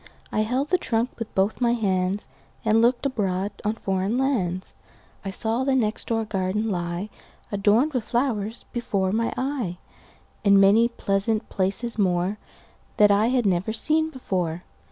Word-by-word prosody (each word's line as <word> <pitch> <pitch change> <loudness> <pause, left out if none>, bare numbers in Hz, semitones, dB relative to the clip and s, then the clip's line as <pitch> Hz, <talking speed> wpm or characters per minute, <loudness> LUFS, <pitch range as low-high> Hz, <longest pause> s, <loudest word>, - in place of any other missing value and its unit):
I - - 0
held 250 +7 0
the 365 - +3
trunk 230 +1 0
with 230 - -6
both 195 +5 +1
my 240 -1 +3
handsAnd 190 -2 0 0.6
looked 240 +3 +2
abroad 200 -6 -1
on 210 - +1
foreign 195 +2 -1
lands.I 195 -5 -4
saw 225 +5 -1
the 270 0 +2
next 220 -4 0
door 225 -1 0
garden 210 +2 -1
lie, 175 +2 -3 0.4
Adorned 215 +9 +3
with 250 -4 0
flowers, 235 -3 -1
before 195 -6 -1
my 230 +3 0
eye, 255 -10 -2 0.7
And 200 -1 +6
many 205 +4 +6
pleasant 215 -1 -1
places 200 +5 -1
moreThat 195 +2 0
I 205 +2 +4
had 250 -2 +1
never 185 +2 +1
seen 315 +7 +2
before. 180 - -3
215 Hz, 140 wpm, -24 LUFS, 195-240 Hz, 0.7 s, And